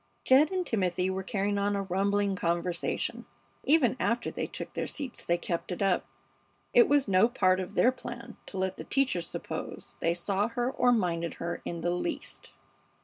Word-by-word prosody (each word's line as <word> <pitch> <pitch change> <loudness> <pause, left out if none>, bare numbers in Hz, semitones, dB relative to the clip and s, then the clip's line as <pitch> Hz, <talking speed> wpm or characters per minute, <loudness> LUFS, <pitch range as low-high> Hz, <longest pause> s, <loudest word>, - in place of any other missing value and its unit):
Jed 275 +4 +6
and 370 -1 -1
Timothy 185 - 0
were 190 0 -2
carrying 200 0 -1
on 205 0 +1
a 200 - -1
rumbling 200 +1 +1
conversation. 170 0 -1 0.4
Even 280 -6 +4
after 235 +1 0
they - - -3
took - - -6
their - - -2
seats 275 -4 -5
they 175 - +1
kept 170 +1 -3
it 180 - -2
up. 190 -2 +1 0.7
It 480 -2 +6
was 285 -3 +4
no 195 +4 +5
part 185 -7 +3
of 185 -1 -5
their 250 - +5
plan 240 -2 -8
to 195 - -7
let 190 0 -1
the - - -6
teacher 265 -9 +1
suppose 170 - -6
they 170 +1 +1
saw 195 +4 0
her 240 +2 -1
or 250 -2 +3
minded 170 -7 0
her 170 0 -4
in 170 -1 -4
the 175 - 0
least. 180 - -4
195 Hz, 185 wpm, -29 LUFS, 180-245 Hz, 0.7 s, Jed